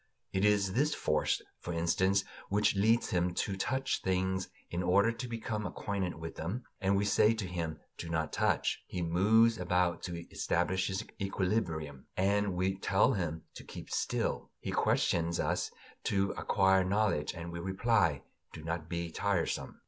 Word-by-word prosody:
It 95 Hz, -, +1 dB
is 100 Hz, -2 st, +3 dB
this 145 Hz, +4 st, +2 dB
force, -, -, +1 dB, 0.2 s
for 85 Hz, -, -5 dB
instance, 95 Hz, +4 st, +2 dB, 0.3 s
which 105 Hz, +1 st, +3 dB
leads 110 Hz, +4 st, +3 dB
him 90 Hz, 0 st, +1 dB
to 100 Hz, -, -1 dB
touch 130 Hz, +7 st, -1 dB
things 95 Hz, 0 st, 0 dB, 0.2 s
in 85 Hz, -, -1 dB
order 100 Hz, +5 st, +4 dB
to 125 Hz, +2 st, -5 dB
become 115 Hz, -3 st, -3 dB
acquainted 95 Hz, 0 st, -3 dB
with 80 Hz, 0 st, -7 dB
them, 95 Hz, +11 st, -3 dB, 0.2 s
and 100 Hz, 0 st, +2 dB
we 100 Hz, -, +1 dB
say 105 Hz, +2 st, +4 dB
to 110 Hz, -3 st, -3 dB
him, 85 Hz, -4 st, -3 dB, 0.2 s
"Do 85 Hz, -, -5 dB
not 80 Hz, -2 st, -1 dB
touch"; -, -, +1 dB
he 90 Hz, -, -3 dB
moves 110 Hz, +7 st, +4 dB
about 90 Hz, -1 st, +1 dB
to 85 Hz, -1 st, -5 dB
establish 95 Hz, +2 st, +1 dB
his 95 Hz, +3 st, -2 dB, 0.2 s
equilibrium, 90 Hz, -8 st, -1 dB
and 100 Hz, 0 st, +2 dB
we 95 Hz, +1 st, 0 dB
tell 95 Hz, +1 st, +3 dB
him 80 Hz, -5 st, -2 dB
to -, -, -10 dB
"keep -, -, -9 dB
still"; -, -, -1 dB
he -, -, -4 dB
questions 85 Hz, 0 st, +1 dB
us -, -, 0 dB, 0.4 s
to 100 Hz, 0 st, +1 dB
acquire 95 Hz, -1 st, +3 dB
knowledge, 95 Hz, -6 st, +1 dB
and 85 Hz, 0 st, -6 dB
we 85 Hz, -, -5 dB
reply, 95 Hz, -, +1 dB, 0.3 s
"Do 75 Hz, -, -9 dB
not 80 Hz, -1 st, -3 dB
be 85 Hz, -1 st, -3 dB
tiresome." 95 Hz, -2 st, -1 dB
95 Hz, 165 wpm, -32 LUFS, 85-105 Hz, 0.4 s, order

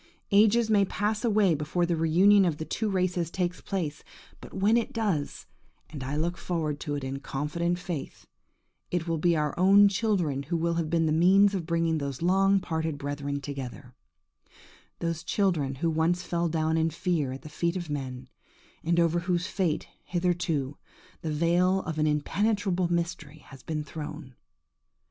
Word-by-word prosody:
Ages 220 Hz, +3 st, +5 dB
may 210 Hz, -2 st, +4 dB
pass 210 Hz, +2 st, -1 dB
away 210 Hz, -6 st, +3 dB
before 155 Hz, +4 st, 0 dB
the 170 Hz, 0 st, 0 dB
reunion 180 Hz, +6 st, +5 dB
of 170 Hz, -5 st, 0 dB
the 160 Hz, -, -5 dB
two 220 Hz, +5 st, -2 dB
races 180 Hz, -3 st, 0 dB
takes 180 Hz, 0 st, -2 dB
place, 165 Hz, -7 st, -3 dB, 0.4 s
but -, -, -12 dB
when 205 Hz, +4 st, +2 dB
it 235 Hz, +3 st, 0 dB
does 200 Hz, -, -2 dB, 0.5 s
(and 145 Hz, -4 st, -6 dB
I 135 Hz, +3 st, -3 dB
look 170 Hz, +4 st, -1 dB
forward 155 Hz, -4 st, -2 dB
to 145 Hz, -, -3 dB
it 145 Hz, -, -4 dB
in 135 Hz, +1 st, -4 dB
confident 170 Hz, +6 st, -2 dB
faith), 175 Hz, -6 st, -6 dB, 0.6 s
it 175 Hz, -1 st, -2 dB
will 165 Hz, -1 st, -1 dB
be 170 Hz, 0 st, +3 dB
our 150 Hz, -2 st, 0 dB
own 200 Hz, +2 st, +7 dB
children 190 Hz, -9 st, 0 dB
who 155 Hz, +5 st, -2 dB
will 170 Hz, +1 st, 0 dB
have 165 Hz, -2 st, -1 dB
been 165 Hz, 0 st, +2 dB
the 155 Hz, -, +1 dB
means 190 Hz, +5 st, +5 dB
of 175 Hz, -5 st, -3 dB
bringing 165 Hz, -1 st, +1 dB
the 140 Hz, -2 st, -4 dB
long 195 Hz, +3 st, +3 dB
parted 160 Hz, -4 st, -3 dB
brethren 145 Hz, 0 st, -4 dB
together: 135 Hz, -2 st, -7 dB, 1.0 s
those 165 Hz, 0 st, -3 dB
children 170 Hz, -8 st, 0 dB
who 165 Hz, +5 st, 0 dB
once 165 Hz, +3 st, +1 dB
fell 170 Hz, -1 st, -1 dB
down 160 Hz, 0 st, 0 dB
in 160 Hz, 0 st, +2 dB
fear 165 Hz, -4 st, -1 dB
at 135 Hz, +3 st, -8 dB
the -, -, -9 dB
feet 170 Hz, +3 st, -2 dB
of 175 Hz, -2 st, -5 dB
men, 130 Hz, -3 st, -5 dB, 0.6 s
and 170 Hz, +1 st, +2 dB
over 170 Hz, 0 st, +3 dB
whose 175 Hz, 0 st, -1 dB
fate, 185 Hz, -6 st, -1 dB, 0.2 s
hitherto, 175 Hz, -6 st, -1 dB, 0.4 s
the 160 Hz, -, -3 dB
veil 175 Hz, +5 st, +2 dB
of 160 Hz, -2 st, -4 dB
an 155 Hz, -, +2 dB
impenetrable 185 Hz, +4 st, 0 dB
mystery 170 Hz, -3 st, -2 dB
has 135 Hz, -1 st, -13 dB
been 155 Hz, +1 st, -3 dB
thrown. 150 Hz, -2 st, -8 dB
170 Hz, 170 wpm, -28 LUFS, 150-185 Hz, 1.0 s, own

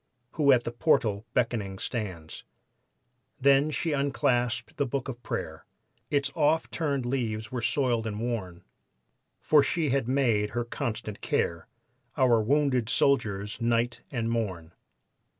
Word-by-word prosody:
Who 145 Hz, -3 st, +3 dB
at 125 Hz, -2 st, +4 dB
the 120 Hz, -, -3 dB
portal 115 Hz, -5 st, +1 dB
beckoning 110 Hz, -6 st, 0 dB
stands. 95 Hz, -9 st, -5 dB, 1.0 s
Then 140 Hz, +2 st, +4 dB
she 155 Hz, +3 st, -1 dB
unclasped 135 Hz, -4 st, 0 dB
the 140 Hz, -1 st, +1 dB
book 135 Hz, +1 st, -3 dB
of 120 Hz, -2 st, -6 dB
prayer, 80 Hz, -7 st, -5 dB, 0.5 s
Its 140 Hz, -1 st, +1 dB
oft 155 Hz, +1 st, +1 dB
turned 140 Hz, -6 st, -1 dB
leaves 110 Hz, -4 st, -2 dB
were 125 Hz, -2 st, -3 dB
soiled 120 Hz, -3 st, +1 dB
and 105 Hz, -1 st, -4 dB
worn, 105 Hz, -7 st, -4 dB, 0.8 s
For 150 Hz, -2 st, +5 dB
she 160 Hz, 0 st, 0 dB
had 135 Hz, -3 st, +1 dB
made 120 Hz, -6 st, +2 dB
her 120 Hz, -, 0 dB
constant 115 Hz, -4 st, -4 dB
care 85 Hz, -1 st, -1 dB, 0.5 s
Our 120 Hz, -4 st, +4 dB
wounded 130 Hz, -1 st, +1 dB
soldiers 110 Hz, -6 st, +1 dB
night 115 Hz, 0 st, +1 dB
and 120 Hz, -4 st, -2 dB
morn. 95 Hz, -8 st, -3 dB
120 Hz, 135 wpm, -28 LUFS, 110-140 Hz, 1.0 s, For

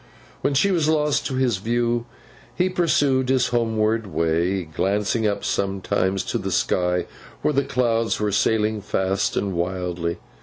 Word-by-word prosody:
When 140 Hz, -, 0 dB
she 200 Hz, +9 st, +3 dB
was 165 Hz, -4 st, +2 dB
lost 150 Hz, -2 st, +1 dB
to 130 Hz, -, -3 dB
his 130 Hz, -5 st, +1 dB
view, 120 Hz, +3 st, -1 dB, 0.5 s
he 180 Hz, +1 st, +1 dB
pursued 145 Hz, -7 st, +2 dB
his 130 Hz, -2 st, +2 dB
homeward 115 Hz, -2 st, 0 dB
way, 85 Hz, +2 st, 0 dB
glancing 100 Hz, +7 st, 0 dB
up 100 Hz, -, -2 dB
sometimes 95 Hz, -1 st, -1 dB
at -, -, -1 dB
the -, -, -3 dB
sky, 90 Hz, 0 st, +1 dB, 0.4 s
where 150 Hz, -, +2 dB
the 140 Hz, 0 st, +2 dB
clouds 120 Hz, -4 st, 0 dB
were 105 Hz, -1 st, 0 dB
sailing 110 Hz, +1 st, +1 dB
fast 95 Hz, 0 st, -1 dB
and 100 Hz, -1 st, -1 dB
wildly. 90 Hz, -1 st, -2 dB
110 Hz, 150 wpm, -23 LUFS, 95-130 Hz, 0.5 s, she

